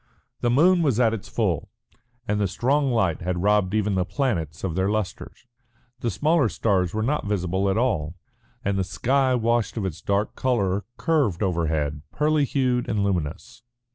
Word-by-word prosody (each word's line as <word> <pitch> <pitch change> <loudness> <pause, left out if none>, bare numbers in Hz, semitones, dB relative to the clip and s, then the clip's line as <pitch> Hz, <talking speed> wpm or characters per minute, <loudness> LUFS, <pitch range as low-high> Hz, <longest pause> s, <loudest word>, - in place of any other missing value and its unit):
The 120 - +1
moon 170 +8 +4
was 135 -8 +1
at 115 -3 +3
its 110 - -6
full, - - -1 0.6
and 105 -2 0
the 100 - +2
strong 135 +8 +1
light 95 -9 +1
had 90 0 -2
robbed 105 -1 +2
even 105 -1 +1
the 95 -1 +1
planets 90 - -2
of 95 -4 -1
their 95 +3 0
lustre. 105 -3 -3 0.7
The 120 - -1
smaller 145 - +2
stars 95 -6 +1
were 110 +2 -2
not 140 -2 -1
visible 95 -1 0
at 95 - +1
all, 85 -10 0 0.5
and 100 -1 0
the - - +2
sky 130 +8 +1
washed 115 -1 0
of 105 - -1
its 85 -3 -5
dark 100 +1 0
colour, 100 -7 0
curved 140 - +1
overhead, 80 -5 -1
pearly 150 -1 +2
hued 125 -3 0
and 105 -2 0
luminous. 85 -5 -3
105 Hz, 170 wpm, -24 LUFS, 90-125 Hz, 0.7 s, moon